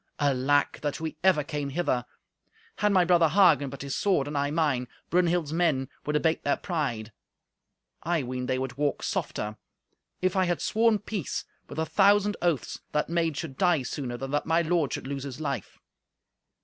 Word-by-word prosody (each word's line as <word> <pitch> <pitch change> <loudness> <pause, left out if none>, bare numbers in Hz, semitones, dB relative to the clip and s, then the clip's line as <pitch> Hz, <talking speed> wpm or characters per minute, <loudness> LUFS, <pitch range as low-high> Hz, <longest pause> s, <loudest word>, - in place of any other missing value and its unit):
Alack! 145 0 +2
that 145 -1 -2
we 160 0 -4
ever 185 -6 +4
came 145 -1 -3
hither! 135 -5 -1 0.7
Had 210 - +2
my 185 -3 +4
brother 170 -2 +4
Hagen 160 -6 +5
but 140 +1 -8
his 140 -1 -3
sword, 185 -9 +1
and 145 - -5
I 140 0 +1
mine, 145 -5 0 0.2
Brunhild's 175 -3 +2
men 155 -6 +1 0.2
would 150 - 0
abate 160 +2 +1
their 140 - +1
pride; 125 - -3 0.9
I 170 -3 0
ween 125 0 -4
they 130 - 0
would 130 0 -4
walk 145 -1 0
softer. 105 +1 -3 0.6
If 185 0 0
I 190 -1 +3
had 175 -1 0
sworn 225 0 +3
peace 205 - -4 0.2
with - - -8
a 160 - 0
thousand 205 +3 +4
oaths, 170 -6 0
that 150 - 0
maid 165 -3 0
should 145 -5 -6
die 175 -7 +3
sooner 125 -1 -4
than 135 +2 -5
that 145 0 -1
my 165 +1 +3
lord 165 -3 +1
should - - -4
lose 135 0 -4
his 135 0 -7
life." 135 -9 -4
150 Hz, 180 wpm, -27 LUFS, 135-175 Hz, 0.9 s, Hagen